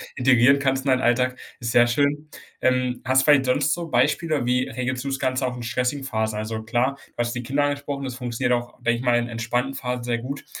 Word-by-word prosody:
integrieren 130 +1 +4
kannst 135 -1 0
in 135 - +3
deinen 130 0 +2
Alltag, 125 +1 +1 0.2
ist 115 -1 -3
sehr 120 0 +5
schön. 145 +4 0 0.3
Ähm, 125 -1 +1
hast 130 0 +3
du - - -1
vielleicht 145 -3 +5
sonst 145 +4 +2
so 170 -1 -4
Beispiele? 145 +2 +1
Wie 125 +1 +1
regelst 125 +1 -3
du 140 - -5
das 135 - -1
Ganze 130 0 0
auch 125 - -4
in 120 - -7
stressigen 125 +4 -1
Phasen? 110 -3 -2
Also 110 +1 -4
klar, 120 +5 0
du - - -32
hast 120 0 -1
die 120 - -3
Kinder 140 +4 0
angesprochen, 145 -1 -2
das 130 -2 -4
funktioniert 125 -1 -1
auch, 120 0 -2
denke 120 0 +2
ich - - -5
mal 120 -2 +3
in 120 0 -1
entspannten 120 +3 -2
Phasen, 125 -2 -3
sehr 120 -1 -1
gut. 135 +4 -6
125 Hz, 240 wpm, -23 LUFS, 120-135 Hz, 0.3 s, sehr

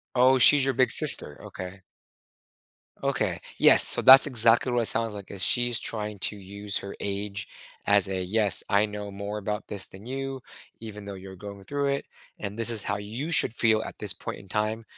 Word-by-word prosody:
Oh, 130 +1 +3
she's 135 +2 +6
your 135 -2 -1
big 130 -2 +1
sister, 75 - +5
okay. 95 +1 -10 1.2
Okay. - - -3 0.2
Yes, - - +6
so - - +5
that's 135 +1 +8
exactly 120 -1 +1
what 120 - 0
it - - -2
sounds 115 -1 +1
like, 100 -2 -10
that 100 - -9
she's 120 +5 +1
trying 105 -2 -6
to 105 - -3
use 100 +1 -6
her 100 - -10
age 100 0 -6 0.4
as 100 -2 +2
a, 95 -1 -4
"Yes, 100 +1 +2
I 100 +1 +1
know 105 -1 -8
more 100 +2 -7
about 105 +1 -6
this 100 -2 -5
than 95 +2 -14
you 135 +1 -6 0.4
even 105 -2 -10
though 100 0 -8
you're 95 0 -12
going 100 +1 -11
through 140 +4 -3
it, 140 - -4 0.3
and 100 +2 -7
this 115 +1 +2
is 110 -3 0
how 105 - -3
you 110 +10 -7
should 165 - +3
feel 110 -2 +1
at - - -10
this - - -4
point - - -9
in 95 - -17
time." 110 +3 -3
105 Hz, 200 wpm, -25 LUFS, 100-120 Hz, 1.2 s, that's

